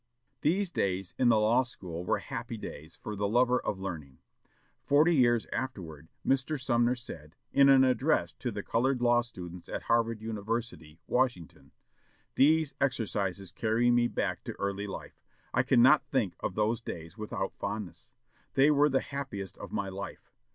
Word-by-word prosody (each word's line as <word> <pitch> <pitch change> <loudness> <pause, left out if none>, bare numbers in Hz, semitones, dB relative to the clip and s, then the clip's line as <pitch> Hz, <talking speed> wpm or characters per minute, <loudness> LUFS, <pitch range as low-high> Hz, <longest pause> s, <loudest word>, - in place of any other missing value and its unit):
These 180 +4 +1
days 95 - -1
in 125 -2 +4
the 115 - +5
law 115 +4 +4
school 90 -9 -7
were - - +1
happy - - -6
days 80 +3 -9
for 105 - -4
the 100 0 -1
lover 125 +3 +3
of 100 - -3
learning. 80 -8 -6 0.7
Forty 150 +5 +4
years 120 -4 +3
afterward, 85 - -5 0.2
Mr. 135 +3 +1
Sumner 120 -1 +2
said, 80 - -10 0.2
in 140 0 +6
an 135 -1 +7
address 130 -1 +2
to - - -2
the - - -5
colored 130 +3 +1
law 120 0 +4
students 90 -7 -9
of - - -4
Howard 115 -1 +1
University, 110 -6 -4
Washington, 125 -10 -1 0.6
"These 155 +1 +4
exercises 100 -7 -1
carry 115 +4 +2
me 120 0 +4
back - - -2
to - - -4
early 100 +1 -2
life.... 95 - -8 0.3
I 125 - +4
cannot 130 +3 +5
think 115 -10 0
of 90 - -3
those 110 +2 +1
days 85 -6 -7
without 105 -2 -4
fondness. 105 -4 -6 0.4
They 140 +3 +5
were 145 0 +4
the 135 -1 +2
happiest 130 -10 -5
of - - -8
my 100 -1 -2
life.... 100 +1 -8
115 Hz, 160 wpm, -30 LUFS, 95-130 Hz, 0.7 s, an